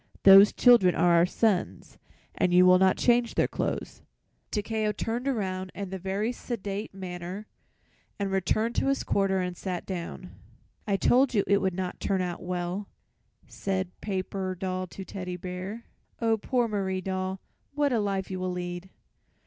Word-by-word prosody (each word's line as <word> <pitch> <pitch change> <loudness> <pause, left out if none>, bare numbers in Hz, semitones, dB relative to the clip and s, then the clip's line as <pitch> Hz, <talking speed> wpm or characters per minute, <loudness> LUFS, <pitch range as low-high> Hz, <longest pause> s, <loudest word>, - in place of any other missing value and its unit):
Those 195 +1 +9
children 235 -8 +5
are 175 -1 +4
our 170 +1 +5
sons 210 -2 -1 0.3
and 180 - +1
you 180 +1 +6
will 185 0 +7
not 190 0 +4
change 240 -1 +2
their - - +3
clothes." - - -4 0.5
Takeo 215 0 -1
turned 230 +5 -3
around 190 -7 -2
in 195 -1 -5
a 190 - -4
very 195 +5 -1
sedate 210 -4 -5
manner 185 +1 -7 0.7
and 200 -1 -2
returned 205 +5 0
to - - +1
his 275 0 +1
corner 195 -1 +1
and 180 -1 -2
sat 180 -1 -4
down. 170 - -6 0.6
"I 200 -2 +2
told 255 +4 +3
you 200 - +3
it 200 +1 +3
would 190 -2 0
not 185 -1 -4
turn 195 -2 0
out 175 -1 -4
well," 180 +2 -3 0.6
said 190 -2 -3
Paper 190 -1 -3
Doll 185 -1 -3
to 190 +2 -9
Teddy 180 -2 -6
Bear. 185 +5 -6 0.4
"Oh, 225 -1 +2
poor 240 +2 0
Marie 190 -3 -2
Doll, 190 0 -3 0.4
what 290 -2 +2
a 230 - +2
life 195 -2 -2
you 185 - -3
will 185 0 -2
lead!" 175 +1 -5
190 Hz, 165 wpm, -27 LUFS, 185-210 Hz, 0.7 s, Those